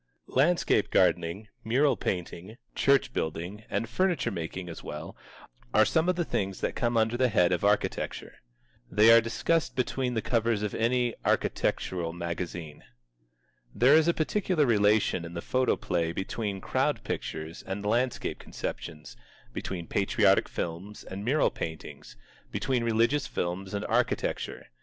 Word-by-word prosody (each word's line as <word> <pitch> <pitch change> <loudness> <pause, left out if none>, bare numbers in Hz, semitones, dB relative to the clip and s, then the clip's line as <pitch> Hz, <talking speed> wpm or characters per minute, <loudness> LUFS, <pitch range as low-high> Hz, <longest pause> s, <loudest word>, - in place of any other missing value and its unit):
Landscape 165 +7 +3
gardening, 85 +6 +1 0.2
mural 130 +4 +3
painting, 90 +2 -4 0.2
church 135 -2 +3
building, 85 +7 -4
and 115 - -1
furniture 170 - 0
making 90 0 -5
as 85 - -8
well, 75 +3 -7 0.6
are 110 - +6
some 160 - +2
of 180 - +2
the 175 -1 -1
things 95 -7 -2
that - - -1
come 120 -1 0
under 110 +1 +2
the 130 0 +3
head 90 -5 +3
of 90 - 0
architecture. 105 +1 -1 0.5
They 110 +2 +6
are 115 0 +8
discussed 160 +8 0
between 125 0 -1
the 110 - 0
covers 115 -3 +1
of 105 - -2
any 120 +1 +1
architectural 85 -3 0
magazine. 85 -2 -5 0.9
There 130 +4 +5
is 160 +1 +5
a 170 - +4
particular 175 -1 +1
relation 105 -5 +3
in 85 +1 -8
the - - -3
photoplay 85 -7 0
between 100 +1 -3
Crowd - - 0
Pictures 80 +1 -5
and 100 +2 -5
landscape 120 +3 0
conceptions, 75 -7 -7 0.4
between 90 -3 -4
Patriotic - - +2
Films 90 +5 -5
and 95 +1 -7
mural 140 +7 +2
paintings, 80 -5 -7 0.3
between 130 -3 0
Religious 115 +5 +2
Films 90 +2 -3
and 100 - -3
architecture. - - -1
110 Hz, 140 wpm, -28 LUFS, 90-125 Hz, 0.9 s, are